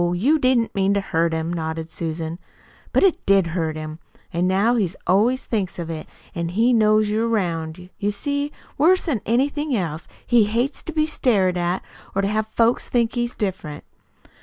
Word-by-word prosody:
You 275 - +3
didn't 255 -4 +2
mean 195 0 +2
to - - +3
hurt 170 -4 0
him," 160 +1 -2
nodded 160 -1 -4
Susan. 165 0 -4 0.5
"But - - +3
it 385 -4 +3
did 195 -2 +5
hurt 160 -3 -1
him. 155 0 -6 0.3
An' 175 +2 +1
now 200 +6 +3
he 210 -7 +1 0.2
always 235 +8 +2
thinks 200 -6 -2
of 170 -2 -4
it, 155 -1 -6 0.3
if 170 0 -2
he 225 +7 +3
knows 215 -1 +4
you're 220 +2 +1
'round. 180 -4 -2
You 205 -1 0
see, 285 +6 -2 0.3
worse'n 320 - +3
anything 280 +3 +1
else, 165 -4 -3 0.2
he 235 -3 +4
hates 235 +7 -1
to - - -4
be 310 -1 +2
stared 210 - +2
at 175 +1 -1 0.3
or 195 - +1
to - - +2
have 215 +1 0
folks 230 +2 +1
think 235 -1 +1
he's 240 0 -2
different. 185 -7 -4
200 Hz, 180 wpm, -22 LUFS, 170-240 Hz, 0.5 s, did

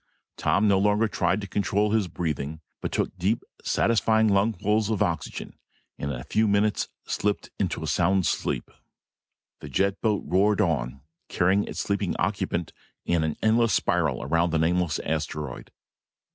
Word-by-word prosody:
Tom 100 +2 +2
no 100 -2 +4
longer 105 +3 +3
tried 95 -1 0
to 100 - -6
control 105 +1 0
his 110 -4 +2
breathing, 80 -3 -3 0.2
but - - -3
took - - -1
deep 100 +6 +1 0.2
satisfying 110 -1 +2
lungfuls 105 +1 +2
of 110 -3 +1
oxygen 85 -1 -4 0.4
and 70 - -3
in 65 -4 -3
a - - -7
few 110 +8 +1
moments 100 +1 +1 0.2
slipped 105 -1 -2
into - - -1
a - - -3
sound 95 +1 +2
sleep. - - -1 0.9
The 75 - -9
jet 100 +7 0
boat 105 -3 +1
roared 100 +3 +2
on, 70 - 0 0.3
carrying 95 +3 +2
its - - -4
sleeping 100 -2 -1
occupant 90 -3 -1 0.3
in 85 -2 +1
an 80 -1 -2
endless 115 +1 +3
spiral 80 -9 +1
around 85 +5 +1
the 80 - +1
nameless 85 0 +1
asteroid. 75 -3 -3
95 Hz, 155 wpm, -26 LUFS, 80-105 Hz, 0.9 s, no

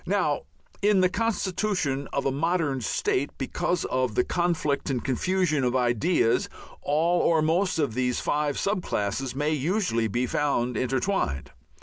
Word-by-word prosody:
Now - - 0 0.4
in 205 -2 +4
the 185 - +4
constitution 185 -9 -1
of 140 - -1
a 135 - +2
modern 150 -2 0
state, 130 +4 0
because 175 +6 -1
of 130 -4 -1
the - - +3
conflict 170 -6 0
and 130 -3 -1
confusion 155 +2 +1
of 125 0 +1
ideas, 120 - +2 0.3
all 165 +4 +2
or 160 -2 +3
most 175 +4 +1
of 145 -7 0
these 125 0 0
five 145 -1 0
sub 200 -1 0
classes 120 - -2
may 150 +2 0
usually 155 - 0
be 120 +4 0
found 125 -3 0
intertwined. 130 - -1
145 Hz, 145 wpm, -26 LUFS, 130-180 Hz, 0.4 s, in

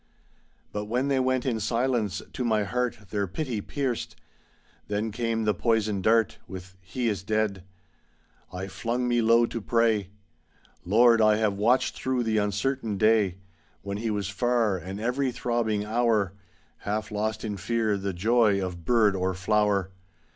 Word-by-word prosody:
But 105 0 -3
when 125 +6 -1
they 135 -1 +2
went 130 -1 +1
in 120 -4 0
silence, 115 -3 0
to 125 - -3
my 110 -3 +2
heart 125 +3 -1
Their 100 -2 -1
pity 120 - -3
pierced. 130 0 -3 0.7
Then 105 +2 -2
came 115 0 -1
the 105 -1 +2
poisoned 110 -1 0
dart, 110 +1 +2
With 95 0 -9
"He 115 +6 -3
is 100 -5 -1
dead." 105 -1 -1 0.9
I 90 +1 -5
flung 120 +4 -2
me 120 -1 +2
low 115 +1 +5
to 115 0 -5
pray. 110 -3 +1 0.8
^Tiord, 115 +3 +5
I 110 -1 +5
have 110 -2 +1
watched 115 +6 +2
through 130 -2 -1
the 110 -1 +1
uncertain 105 +2 -1
day 110 -3 +3 0.5
When 100 0 -4
he 115 +2 -2
was 105 -3 -1
far, 115 0 +1
and 95 +3 -6
ev'ry 125 +4 0
throbbing 115 -4 -1
hour. 110 -4 +1 0.4
Half 105 +1 -3
lost 110 +1 -2
in 105 -2 -3
fear 110 +3 0
the 100 0 -2
joy 105 +2 +3
of 90 -3 -4
bird 110 -1 +3
or 95 0 -1
flower. 100 0 +1
110 Hz, 155 wpm, -27 LUFS, 100-120 Hz, 0.9 s, low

